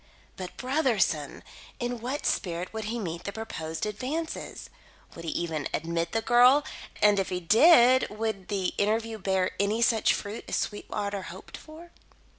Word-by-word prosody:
But 185 Hz, -1 st, -8 dB
Brotherson! 235 Hz, -, 0 dB, 0.4 s
In 245 Hz, 0 st, -3 dB
what 260 Hz, +5 st, -3 dB
spirit 175 Hz, +1 st, -1 dB
would 220 Hz, -1 st, -4 dB
he 230 Hz, +3 st, -3 dB
meet 170 Hz, -6 st, -5 dB
the 200 Hz, -, -3 dB
proposed 165 Hz, -7 st, -5 dB
advances? 270 Hz, +10 st, -4 dB, 0.5 s
Would 165 Hz, -, -9 dB
he -, -, -2 dB
even 160 Hz, -4 st, -2 dB
admit 165 Hz, +1 st, -2 dB
the 225 Hz, 0 st, -1 dB
girl, 250 Hz, +5 st, +6 dB, 0.4 s
and, 205 Hz, -1 st, +5 dB
if 195 Hz, -, -1 dB
he 180 Hz, -, -2 dB
did, 250 Hz, -, +6 dB
would 215 Hz, -3 st, -4 dB
the 195 Hz, -3 st, -1 dB
interview 220 Hz, +2 st, 0 dB
bear 190 Hz, -1 st, 0 dB
any 210 Hz, +3 st, +2 dB
such 230 Hz, -2 st, +3 dB
fruit 205 Hz, +3 st, -6 dB
as -, -, -2 dB
Sweetwater 205 Hz, -1 st, -3 dB
hoped 185 Hz, +1 st, -10 dB
for? 325 Hz, +2 st, -12 dB
210 Hz, 155 wpm, -28 LUFS, 185-240 Hz, 0.5 s, girl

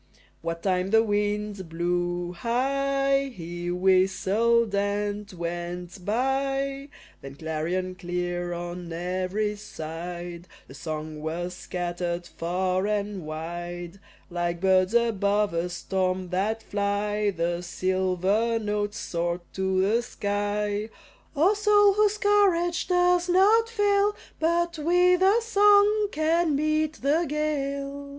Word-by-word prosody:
What 165 Hz, 0 st, -4 dB
time 185 Hz, -1 st, +1 dB
the 225 Hz, +2 st, +5 dB
wind 205 Hz, -3 st, -1 dB
blew 175 Hz, +1 st, -1 dB
high, 275 Hz, +5 st, 0 dB
he 175 Hz, -3 st, -6 dB
whistled 190 Hz, +5 st, +2 dB
and 205 Hz, +1 st, -1 dB
went 175 Hz, +1 st, -5 dB
by 270 Hz, +5 st, -1 dB, 0.3 s
Then 135 Hz, 0 st, -9 dB
clarion 165 Hz, +4 st, -2 dB
clear 175 Hz, -1 st, -3 dB
on 175 Hz, 0 st, -5 dB
every 185 Hz, +5 st, -2 dB
side 175 Hz, -2 st, -7 dB, 0.2 s
The -, -, -12 dB
song 155 Hz, +1 st, -6 dB
was 170 Hz, +3 st, -3 dB
scattered 175 Hz, -1 st, -4 dB
far 185 Hz, +3 st, -1 dB
and 205 Hz, -5 st, -2 dB
wide; 175 Hz, +3 st, -6 dB, 0.3 s
Like 175 Hz, 0 st, -2 dB
birds 190 Hz, +2 st, +3 dB
above 210 Hz, -4 st, +2 dB
a 170 Hz, +1 st, -1 dB
storm 185 Hz, 0 st, -2 dB
that 210 Hz, +5 st, -1 dB
fly 205 Hz, 0 st, 0 dB
The 170 Hz, -2 st, -1 dB
silver 185 Hz, +5 st, 0 dB
notes 210 Hz, -1 st, -2 dB
soared 170 Hz, +1 st, -2 dB
to 190 Hz, 0 st, 0 dB
the 220 Hz, +5 st, +2 dB
sky, 205 Hz, -1 st, -2 dB, 0.5 s
"O 335 Hz, +8 st, +4 dB
soul, 415 Hz, -1 st, +4 dB
whose 420 Hz, +1 st, +2 dB
courage 385 Hz, -5 st, +2 dB
does 355 Hz, 0 st, +3 dB
not 420 Hz, +5 st, +4 dB
fail 410 Hz, -2 st, +2 dB, 0.2 s
But 340 Hz, 0 st, +1 dB
with 355 Hz, +3 st, +3 dB
a 405 Hz, +5 st, +4 dB
song 415 Hz, -1 st, +5 dB
can 315 Hz, 0 st, +1 dB
meet 310 Hz, +1 st, +1 dB
the 315 Hz, +5 st, +2 dB
gale." 280 Hz, -2 st, -2 dB
205 Hz, 115 wpm, -26 LUFS, 175-275 Hz, 0.5 s, the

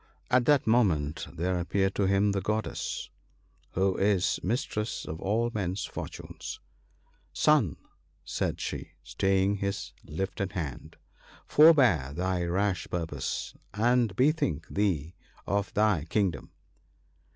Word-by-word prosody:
At 125 Hz, -1 st, +4 dB
that 145 Hz, 0 st, +4 dB
moment 85 Hz, -11 st, +2 dB
there 90 Hz, +2 st, -1 dB
appeared 95 Hz, +2 st, 0 dB
to 100 Hz, -, +1 dB
him 100 Hz, +1 st, +3 dB
the 100 Hz, -1 st, -1 dB
Goddess, 110 Hz, +3 st, -3 dB, 0.6 s
who 95 Hz, +1 st, +2 dB
is 100 Hz, -2 st, +2 dB
Mis 120 Hz, +9 st, 0 dB
tress 105 Hz, -5 st, -4 dB
of 80 Hz, +1 st, -6 dB
all 115 Hz, +4 st, +1 dB
men's 95 Hz, -2 st, -2 dB
fortunes. -, -, -7 dB, 0.4 s
' -, -, -37 dB
Son/ -, -, +4 dB, 0.5 s
said -, -, -2 dB
she, -, -, -5 dB
staying 95 Hz, +9 st, +1 dB
his 100 Hz, 0 st, -3 dB
lifted 95 Hz, +4 st, -3 dB
hand, 75 Hz, -9 st, -5 dB, 0.3 s
' -, -, -24 dB
forbear 125 Hz, -, +5 dB
thy 90 Hz, 0 st, 0 dB
rash 95 Hz, +2 st, 0 dB
purpose, 80 Hz, -6 st, -3 dB, 0.2 s
and 120 Hz, -1 st, +2 dB
bethink 130 Hz, -, +1 dB
thee 90 Hz, -6 st, 0 dB, 0.3 s
of 100 Hz, 0 st, -1 dB
thy 105 Hz, -8 st, +2 dB
kingdom.' 90 Hz, -, -1 dB
95 Hz, 125 wpm, -29 LUFS, 85-105 Hz, 0.6 s, forbear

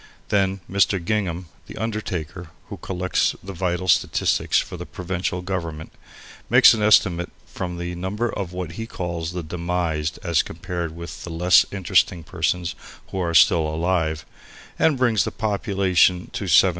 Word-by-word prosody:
Then 95 Hz, -1 st, +1 dB
Mr. 100 Hz, +1 st, +2 dB
Gingham, 90 Hz, -1 st, -2 dB, 0.2 s
the -, -, -10 dB
undertaker, 95 Hz, -6 st, -4 dB, 0.2 s
who -, -, -6 dB
collects 90 Hz, 0 st, -1 dB
the 95 Hz, +1 st, -7 dB
vital 90 Hz, 0 st, -2 dB
statistics 85 Hz, -, +2 dB
for -, -, -1 dB
the -, -, -8 dB
provincial 90 Hz, 0 st, -3 dB
government, 85 Hz, -4 st, -4 dB, 0.6 s
makes -, -, +8 dB
an 110 Hz, -, -2 dB
estimate 90 Hz, -5 st, +4 dB, 0.2 s
from 90 Hz, -1 st, -5 dB
the 85 Hz, 0 st, -4 dB
number 95 Hz, +7 st, -2 dB
of 100 Hz, -5 st, -4 dB
what 90 Hz, -2 st, -5 dB
he 115 Hz, +7 st, -6 dB
calls 85 Hz, -4 st, -4 dB
the 90 Hz, -1 st, -4 dB
"demised" 85 Hz, -1 st, -2 dB
as 85 Hz, -3 st, +2 dB
compared 85 Hz, -2 st, -5 dB
with 85 Hz, -1 st, -8 dB
the -, -, -7 dB
less 90 Hz, +2 st, +4 dB
interesting 90 Hz, -2 st, +1 dB
persons 90 Hz, +2 st, -1 dB, 0.4 s
who 95 Hz, -, -3 dB
are 85 Hz, -2 st, -1 dB
still 80 Hz, +1 st, +5 dB
alive, 80 Hz, -1 st, -1 dB, 0.5 s
and 155 Hz, -4 st, +3 dB
brings 115 Hz, -6 st, +3 dB
the -, -, -2 dB
population 95 Hz, -4 st, +1 dB
to 100 Hz, -, -4 dB
7,000. 95 Hz, +2 st, +6 dB
90 Hz, 155 wpm, -23 LUFS, 85-95 Hz, 0.6 s, makes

